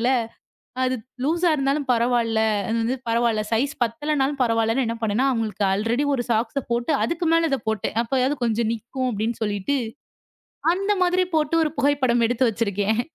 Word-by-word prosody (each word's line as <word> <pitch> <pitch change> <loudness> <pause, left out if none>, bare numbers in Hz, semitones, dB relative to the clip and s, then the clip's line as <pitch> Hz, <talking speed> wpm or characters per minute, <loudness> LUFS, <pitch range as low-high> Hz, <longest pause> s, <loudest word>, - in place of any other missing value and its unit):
ஆர்வத்துல, 240 - +1 0.7
அது 255 0 +1 0.3
லூஸ் 335 +4 0
இருந்தாலும் 280 0 0
பரவாயில்ல, 235 -2 +1 0.3
அது 225 - 0
வந்து 250 +4 0
பரவாயில்ல, 230 -2 +1
சைஸ் 270 +6 +1
பத்தலைன்னா 270 +4 0 0.2
பரவாயில்லன்னு 230 +1 +1
என்ன 230 - -2
பண்ணேன்னா, 225 +4 +1
அவங்களுக்கு 220 -3 -2
அல்ரெடி 230 +7 0
ஒரு 245 - 0
சாக்ஸ் 230 +4 0
போட்டு 240 +6 0
அதுக்கு 340 +1 -2
மேல 330 0 +3
அதைப் 265 -5 -2
போட்டேன். 220 0 -2
அப்பறம் 260 +3 0
கொஞ்சம் 225 0 0
நிக்கும் 255 +3 -4
அப்படின்னு 220 +3 -2
சொல்லிட்டு, 210 +5 -1 1.0
அந்த 395 +2 0
மாதிரி 360 +1 +2
போட்டு 310 +1 +1
ஒரு 305 - -2
புகைப்படம் 265 -5 +2
எடுத்து 245 +1 +2
வச்சிருக்கேன். 210 0 0
240 Hz, 155 wpm, -23 LUFS, 225-280 Hz, 1.0 s, மேல